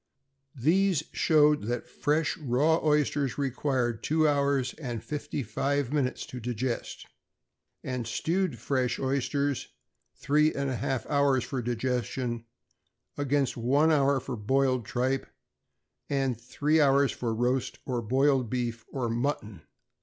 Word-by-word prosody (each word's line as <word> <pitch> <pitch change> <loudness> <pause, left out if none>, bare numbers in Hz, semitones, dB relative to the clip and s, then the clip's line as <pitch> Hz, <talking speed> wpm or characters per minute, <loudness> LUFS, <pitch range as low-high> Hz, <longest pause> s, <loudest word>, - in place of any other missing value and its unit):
These 165 +5 +2
showed 150 -5 +3
that 120 0 -2
fresh 150 +2 0
raw 150 +1 +1
oysters 150 -3 +1
required 130 -4 -1
two 155 0 +2
hours 140 -3 +1
and 120 -5 -4
fifty 150 -2 -4
five 140 +5 -1
minutes 135 -4 0
to 125 - -8
digest, 120 +1 -3 0.8
and 125 -3 -3
stewed 170 +3 -1
fresh 130 +1 0
oysters 140 +1 -1 0.5
three 150 +2 +2
and 140 -1 -1
a - - -1
half 120 +1 -2
hours 140 -3 +2
for 130 -3 -3
digestion; 120 0 -2 0.7
against 140 -3 0
one 140 +7 +3
hour 140 -2 +3
for 130 0 -5
boiled 130 +2 +1
tripe, 130 +4 -1 0.8
and 135 -4 0
three 150 +6 +1
hours 140 -1 +4
for 120 -2 -3
roast 125 +3 0
or 125 -3 -1
boiled 130 +1 +2
beef 120 -2 -2
or 130 -3 -2
mutton." 115 - -2
135 Hz, 125 wpm, -28 LUFS, 120-145 Hz, 0.8 s, hours